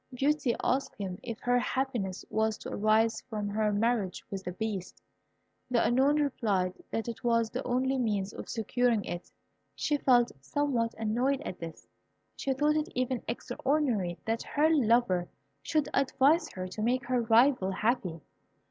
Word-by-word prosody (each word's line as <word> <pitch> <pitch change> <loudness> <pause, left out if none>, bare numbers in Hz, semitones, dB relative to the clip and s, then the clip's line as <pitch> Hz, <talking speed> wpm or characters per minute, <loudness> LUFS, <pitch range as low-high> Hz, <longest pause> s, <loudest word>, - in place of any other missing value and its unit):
Beauty 270 -1 +1
asked 270 +2 0
him 185 -3 -5
if 230 -2 -5
her 245 0 +3
happiness 245 -8 -2
was 220 0 +1
to - - -7
arise 220 +2 +2
from 210 -3 -3
her 210 +1 +1
marriage 210 -2 0
with 195 -1 -4
the 180 - -4
Beast. 195 -1 -4 0.7
The 245 -2 +2
Unknown 270 +5 +3
replied 200 -10 0 0.2
that 225 - -3
it 235 - -6
was 230 -2 +2
the 250 - -3
only 260 +2 +1
means 205 -4 -1
of - - -8
securing 230 -1 +1
it. 175 0 -6 0.4
She 295 - 0
felt 245 -4 +4
somewhat 240 - 0
annoyed 245 +5 0
at 185 - -6
this. 165 -2 -8 0.5
She 275 - -2
thought 295 +3 +2
it 305 +1 -1
even 255 -1 0
extraordinary 240 - -1
that 225 +1 -1
her 310 +2 +2
lover 230 - +3 0.3
should 305 -3 0
advise 275 +4 +3
her 185 0 -4
to 200 +4 -6
make 240 +2 +1
her 250 0 +1
rival 230 -2 +4
happy. 190 -5 -1
235 Hz, 155 wpm, -30 LUFS, 210-260 Hz, 0.7 s, felt